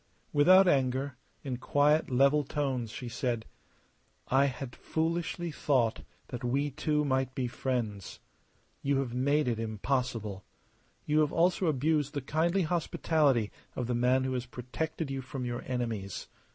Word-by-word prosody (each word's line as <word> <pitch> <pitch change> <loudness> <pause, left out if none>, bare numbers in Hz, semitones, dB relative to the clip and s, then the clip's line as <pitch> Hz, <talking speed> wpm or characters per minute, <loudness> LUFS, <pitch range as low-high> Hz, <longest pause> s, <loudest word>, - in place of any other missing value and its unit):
Without 185 +6 +7
anger, 135 -2 +1 0.3
in 130 -3 -3
quiet, 145 +4 +2
level 140 +3 +4
tones 135 -5 -2
she 125 +3 -7
said: 120 -1 -2 0.8
"I 135 +2 +4
had 130 -2 -4
foolishly 170 +1 -2
thought 130 -6 +1 0.3
that 125 - -6
we 140 +4 0
two 150 +1 0
might 130 -1 0
be 130 - -1
friends. 120 -6 -3 0.6
You 140 0 +1
have 135 -3 -1
made 140 +3 +2
it 115 -2 0
impossible. 110 -2 -2 0.6
You 150 0 +2
have 150 -1 +3
also 175 +2 +2
abused 150 0 +1
the 145 - -1
kindly 170 +7 +1
hospitality 155 -7 +1 0.2
of 125 - -2
the 120 - -1
man 125 +2 +3
who 130 0 -1
has 125 -1 -3
protected 135 +5 -4
you 135 -1 -3
from 130 0 -5
your 120 0 -3
enemies. 115 -7 -3
135 Hz, 145 wpm, -30 LUFS, 125-150 Hz, 0.8 s, Without